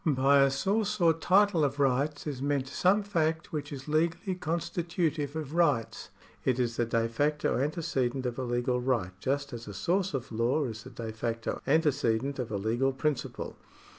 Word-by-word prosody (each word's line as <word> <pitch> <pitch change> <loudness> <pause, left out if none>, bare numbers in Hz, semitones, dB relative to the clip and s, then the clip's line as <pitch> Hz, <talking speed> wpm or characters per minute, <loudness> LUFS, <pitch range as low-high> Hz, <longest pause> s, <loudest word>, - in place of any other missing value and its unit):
By 140 -2 +4
a 135 - +5
source 205 +9 0
or 165 -2 +5
title 185 +1 +3
of 140 0 0
rights 140 +2 +1
is 140 -4 -4
meant 140 -1 0
some 190 +8 +2
fact 165 -5 -1
which 150 -1 -3
is 135 -1 -7
legally 165 +4 0
constitutive 165 -3 -2
of 155 -2 -4
rights. 150 -10 +1 0.3
It 130 -2 +1
is 120 -2 0
the 120 - +1
de 115 -1 +1
facto 145 +4 0
antecedent 135 -4 -1
of 125 +1 -3
a - - -1
legal 120 +1 0
right 120 -8 0
just 140 +4 -2
as 115 -1 -7
a 100 - -7
source 180 - 0
of 135 -1 -5
law 120 +7 +1
is 110 -3 -5
the - - -8
de 115 -2 -6
facto 115 +1 -3
antecedent 140 -4 +1
of 120 -4 -3
a 105 - -1
legal 120 +7 +1
principle. 140 +1 -2
140 Hz, 180 wpm, -29 LUFS, 125-160 Hz, 0.3 s, a